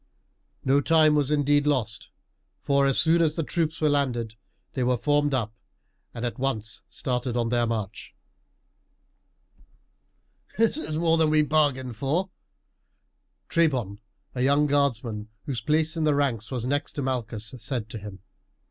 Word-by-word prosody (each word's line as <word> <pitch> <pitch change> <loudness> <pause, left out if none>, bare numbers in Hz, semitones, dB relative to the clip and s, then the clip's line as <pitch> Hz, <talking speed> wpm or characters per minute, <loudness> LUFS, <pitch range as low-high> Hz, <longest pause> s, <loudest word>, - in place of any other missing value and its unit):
No 135 +2 +4
time 155 0 +5
was 145 -2 +2
indeed 145 0 +2
lost, 115 -8 -1 0.5
for 140 -1 +2
as 135 - +3
soon 165 +1 +4
as 155 -2 +2
the 165 - -1
troops 160 0 -1
were 155 - +2
landed 125 -6 0 0.4
they 130 - -1
were 125 0 +2
formed 145 +3 +1
up 115 -5 -1 0.6
and 120 0 -5
at 120 +2 -4
once 110 -5 -2
started 125 -1 -3
on 115 -1 0
their 120 0 +1
march. 110 -3 -5 2.4
"This 225 +2 +3
is 290 - -3
more 165 0 +2
than 160 -1 +4
we 155 0 +4
bargained 140 -6 +1
for," 165 - -1 1.2
Trebon, 130 - +1 0.3
a 125 - -3
young 140 +3 +3
guardsman 120 -7 0 0.2
whose 130 -4 -3
place 155 +1 +1
in 160 - -1
the 150 -2 +3
ranks 125 -6 0
was 125 -3 -3
next 145 +3 -1
to 145 - -3
Malchus, 115 -4 -3
said 115 -1 -3
to 115 -2 -6
him. 100 -2 -10
135 Hz, 150 wpm, -26 LUFS, 120-150 Hz, 2.4 s, time